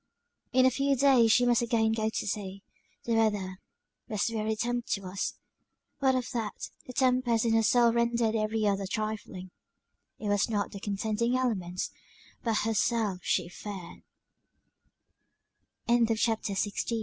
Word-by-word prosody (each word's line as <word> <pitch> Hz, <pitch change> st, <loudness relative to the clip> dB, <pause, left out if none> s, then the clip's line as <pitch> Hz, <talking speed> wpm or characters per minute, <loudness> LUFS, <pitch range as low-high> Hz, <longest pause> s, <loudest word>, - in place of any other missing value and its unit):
In 255 Hz, 0 st, +4 dB
a 260 Hz, -, +5 dB
few 275 Hz, +2 st, +1 dB
days 260 Hz, -4 st, +5 dB
she 245 Hz, +2 st, +5 dB
must 240 Hz, -1 st, +3 dB
again 225 Hz, -1 st, +2 dB
go 220 Hz, -1 st, 0 dB
to -, -, -3 dB
sea; 195 Hz, -1 st, -4 dB, 0.4 s
the 235 Hz, -, -1 dB
weather 205 Hz, -4 st, 0 dB, 0.5 s
was 210 Hz, +1 st, 0 dB
very 220 Hz, -1 st, -1 dB
tempestuous 215 Hz, -5 st, -2 dB, 0.6 s
what 265 Hz, -2 st, +3 dB
of 255 Hz, -1 st, -1 dB
that, 225 Hz, -4 st, -4 dB, 0.2 s
the 250 Hz, -, -7 dB
tempest 250 Hz, -3 st, +2 dB
in 230 Hz, -, +2 dB
her 225 Hz, -, +4 dB
soul 235 Hz, +1 st, +4 dB
rendered 235 Hz, -1 st, +1 dB
every 215 Hz, 0 st, 0 dB
other 200 Hz, -1 st, 0 dB
trifling 205 Hz, -3 st, -4 dB, 0.7 s
it 215 Hz, -, -5 dB
was 205 Hz, 0 st, +2 dB
not 205 Hz, -2 st, -1 dB
the 200 Hz, -, -7 dB
contending 215 Hz, +4 st, -1 dB
elements, 185 Hz, -8 st, -2 dB, 0.5 s
but 230 Hz, -2 st, 0 dB
_hersel 220 Hz, -3 st, +1 dB
225 Hz, 125 wpm, -29 LUFS, 205-240 Hz, 0.7 s, a